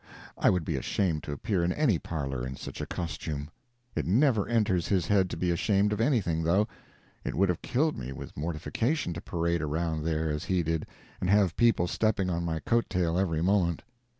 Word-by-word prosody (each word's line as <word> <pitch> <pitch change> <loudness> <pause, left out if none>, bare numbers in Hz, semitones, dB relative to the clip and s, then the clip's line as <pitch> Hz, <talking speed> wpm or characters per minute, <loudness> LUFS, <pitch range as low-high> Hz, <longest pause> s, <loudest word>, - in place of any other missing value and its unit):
I - - +3
would 90 -4 +1
be - - -1
ashamed 85 -6 0
to - - -4
appear 95 +4 -1
in 85 - +1
any 120 - +2
parlor 70 -6 -3
in 65 +1 -4
such - - -7
a - - -4
costume. 75 -2 -4 0.4
It - - -1
never 110 - +3
enters 100 -7 +1
his 95 -4 +2
head 95 -1 +3
to - - -4
be 90 +1 +1
ashamed 100 +3 +2
of 105 - -1
anything, 105 - +2
though. 95 +6 +3 0.6
It - - -3
would 95 0 +3
have 90 - -1
killed 150 +5 +1
me 65 +2 -5
with 65 - -8
mortification 85 - -1
to 85 - -6
parade 85 0 -1
around 80 +1 -1
there 80 -1 0
as 75 0 -3
he 90 -2 +1
did, 80 0 -1 0.3
and 90 - -1
have 100 -4 +4
people 115 -7 +4
stepping 100 0 +1
on 85 0 -1
my 80 -1 -1
coat 120 0 +1
tail 85 -2 +1
every 80 -4 0
moment. 90 -4 +2
85 Hz, 205 wpm, -29 LUFS, 80-100 Hz, 0.6 s, have